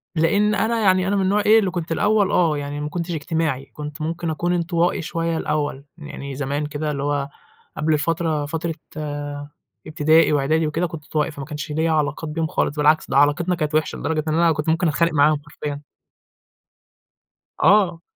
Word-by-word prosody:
لإن 200 +6 +2
أنا 230 +2 +1
يعني 185 -2 +3
أنا 200 - +1
من 195 - +1
النوع 200 +2 +2
إيه، 220 +1 +7
اللي 190 -4 0
كنت 170 -2 -4
الأوّل 205 +3 +2
آه 160 -4 +2
يعني 145 +1 -4
ما 150 - -3
كنتش 170 +1 -4
اجتماعي، 160 -4 -2
كنت 150 +1 -7
ممكن 165 +2 -3
أكون 175 +3 -1
انطوائي 170 0 0
شويّة 165 0 -2
الأوّل، 145 -3 -2
يعني 140 -3 -7
زمان 145 +2 -2
كده 150 0 -3
اللي 140 -1 -3
هو 145 -1 -1 0.5
قبل 155 0 +2
فترة 160 -2 -1
فترة 165 +2 -3 1.1
ابتدائي 155 +1 +3
وإعدادي 155 +3 +1
وكده 165 +4 -1
كنت 155 -2 -8
انطوائي، 155 +1 -1
فما 140 -1 -7
كانش 150 0 -6
ليّ 160 +2 0
علاقات 155 0 -1
بيهم 160 +1 -1
خالص، 150 - -1
بالعكس، 150 +1 +3
ده - - +1
علاقتنا 145 +5 +3
كانت 155 -2 -2
وحشة 155 - 0
لدرجة 155 -1 -1
إن 155 - 0
أنا 165 +1 +4
كنت 150 0 -1
ممكن 165 +2 +2
أتخانق 170 +2 +1
معاهم 150 0 +3
حرفيًا. 145 -1 -5 1.8
آه. 190 -5 +4
160 Hz, 180 wpm, -22 LUFS, 150-170 Hz, 1.8 s, إيه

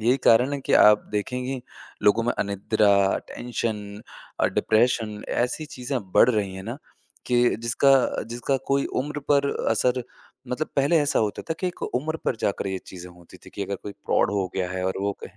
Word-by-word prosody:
यही 120 +4 +3
कारण 125 +5 +5
है 140 - -2
कि - - -3
आप 105 0 +7
देखेंगी, 125 +5 -2 0.4
लोगों 110 +3 +4
में 120 - +1
अनिद्रा, 100 0 +2
टेंशन 105 -4 -4 0.4
अ, - - +4
डिप्रेशन 110 -2 +1
ऐसी 125 +6 -1
चीज़ें 125 +1 -3
बढ़ - - +6
रही 100 -4 -1
हैं 95 - -7
ना, 115 +5 -5 0.5
कि 120 0 +3
जिसका, 120 +4 +2
अ, - - -2
जिसका 120 +3 -1
कोई 140 0 +1 0.2
उम्र 150 +1 -5
पर 140 -1 +3 0.2
असर 125 +3 +1 0.5
मतलब 150 +5 -2
पहले 145 +4 +4
ऐसा 145 - +1
होता 105 -2 -1
था - - +1
कि 185 - 0
एक 180 - -6
उम्र 155 +6 -2
पर 120 - 0
जाकर 100 - -1
ये 95 -1 -2
चीज़ें 90 -1 -10
होती 85 -1 -16
थी - - -11
कि 100 - -5
अगर 100 +1 -4
कोई 100 - -6
प्रॉड - - +2
हो 100 -2 0
गया 95 -1 -2
है 95 0 -3
और 95 - -1
वो 100 0 0
कहे - - -13
115 Hz, 195 wpm, -24 LUFS, 100-130 Hz, 0.5 s, आप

